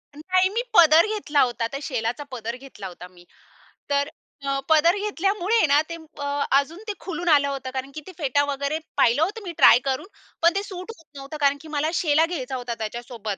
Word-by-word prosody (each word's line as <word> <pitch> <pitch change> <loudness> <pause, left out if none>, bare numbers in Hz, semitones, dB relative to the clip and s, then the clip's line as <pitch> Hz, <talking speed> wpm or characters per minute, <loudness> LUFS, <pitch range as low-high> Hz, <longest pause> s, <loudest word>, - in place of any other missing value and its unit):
नाही, 370 +4 +1
मी 455 +4 -1 0.2
पदर 325 +1 +7
घेतला 395 -10 0
होता. 240 -2 0
त्या 275 +3 -6
शेलाचा 245 +1 -2
पदर 230 -1 -5
घेतला 255 -7 -10
होता 180 0 -10
मी. 175 -1 -19 0.6
तर 285 +1 +1 0.4
अ, 275 0 0
पदर 325 +4 +5
घेतल्यामुळे 405 0 +1
ना 285 +2 +5
ते 335 - -4 0.2
प - - -8 0.3
अजून 305 +6 +1
ते 420 - -2
खुलून 350 -1 -3
आलं 280 0 +2
होतं, 270 -2 -4
कारण 265 +1 -4
की 310 - -7
ते - - -8
फेटा 285 -2 +1
वगैरे 280 +2 -2 0.2
पाहिलं 240 +7 +4
होतं 420 +6 -2
मी 350 - -5
ट्राय 240 - +8
करून, 270 +7 -2 0.3
पण 335 +1 +5
ते 395 - +1
सूट 370 +2 -8
होत 325 - -20
नव्हतं, 275 +3 -7
कारण 280 0 +3
की 320 - -12
मला 305 +2 +1
शेला 315 0 +3
घ्यायचा 275 -6 -4
होता 245 -1 -4
त्याच्यासोबत. 220 -2 -5
285 Hz, 200 wpm, -24 LUFS, 255-345 Hz, 0.6 s, ट्राय